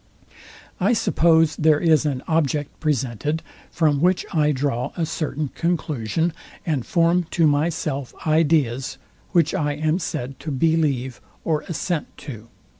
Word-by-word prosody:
I 200 +6 +3
suppose 160 -7 +3
there 155 -1 +4
is 155 -3 +3
an 135 -3 -2
object 150 -2 0
presented, 145 +1 -1 0.3
from 150 -4 +1
which 180 +1 +2
I 150 -2 +3
draw 130 -2 -1
a 165 - +1
certain 155 -2 -3
conclusion, 160 -2 -1 0.3
and 150 -7 0
form 170 0 +2
to 165 - +2
myself 145 -2 0
ideas, 150 -6 +2 0.3
which 170 -4 +3
I 150 -6 0
am 155 +4 0
said 135 -5 -4
to 160 - -6
believe 140 -4 0 0.2
or 155 -2 0
assent 170 -1 -2 0.2
to. 115 -6 -8
155 Hz, 130 wpm, -22 LUFS, 140-165 Hz, 0.3 s, there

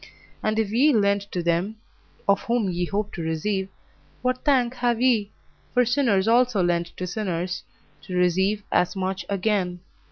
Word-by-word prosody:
And 215 0 0
if 220 -2 0
ye 270 +7 +4
lend 200 -2 +3
to 175 - -2
them 170 +5 0 0.5
of 200 0 +4
whom 230 -5 +1
ye 175 0 -1
hope 205 +3 -2
to 175 - -5
receive, 190 +5 -1 0.5
what 255 0 0
thank 255 -4 +3
have 240 -2 +1
ye? 230 -5 +2 0.4
for 250 0 +5
sinners 230 -6 +2
also 235 -4 +3
lend 175 -1 +1
to 185 - -3
sinners, 180 -2 -3 0.4
to 180 - -4
receive 190 +4 +2
as 180 +3 +2
much 190 0 -3
again. 190 -3 0
200 Hz, 160 wpm, -24 LUFS, 180-230 Hz, 0.5 s, for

